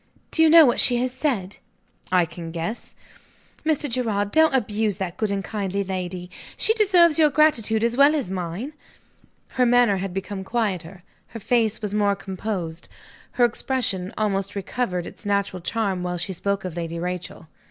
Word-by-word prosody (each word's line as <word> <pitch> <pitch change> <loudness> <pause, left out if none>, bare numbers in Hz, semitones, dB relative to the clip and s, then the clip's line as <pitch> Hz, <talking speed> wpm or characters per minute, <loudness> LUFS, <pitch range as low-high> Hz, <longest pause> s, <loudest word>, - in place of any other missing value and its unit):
"Do 320 - +2
you 320 - +6
know 325 0 +9
what 240 - +2
she 245 - +5
has 250 +1 -1
said?" 245 -8 -2 0.5
"I 180 -2 +4
can 165 0 -9
guess." 170 +8 -5 0.7
"Mr. 310 -1 +1
Gerard, 220 -5 -1
don't 315 -3 +4
abuse 215 -4 0
that 190 -3 -4
good 215 -2 -1
and 200 -1 -2
kind 200 -3 -4 0.2
lady. 180 -1 -5 0.3
She 440 - +3
deserves 360 -8 +4
your 305 -1 +6
gratitude 235 -7 +3
as 235 0 +1
well 285 +3 +5
as 265 -11 -2
mine." 185 - -4 0.8
Her 255 - +1
manner 240 -4 +4
had 190 0 -4
become 195 +1 -5
quieter; 190 -5 -3 0.2
her 230 - -9
face 220 -1 0
was 205 -1 -2
more 205 -1 +2
composed; 190 -4 -5 0.4
her 245 - +4
expression 225 -6 -1
almost 200 -2 -1
recovered 190 -3 -3
its - - -11
natural 200 -3 -1
charm 195 -1 -2
while 180 0 -3
she 175 +3 -3
spoke 200 +2 -2
of 180 -3 -5
Lady 170 -1 -4
Rachel. 180 -1 -5
205 Hz, 170 wpm, -23 LUFS, 185-245 Hz, 0.8 s, know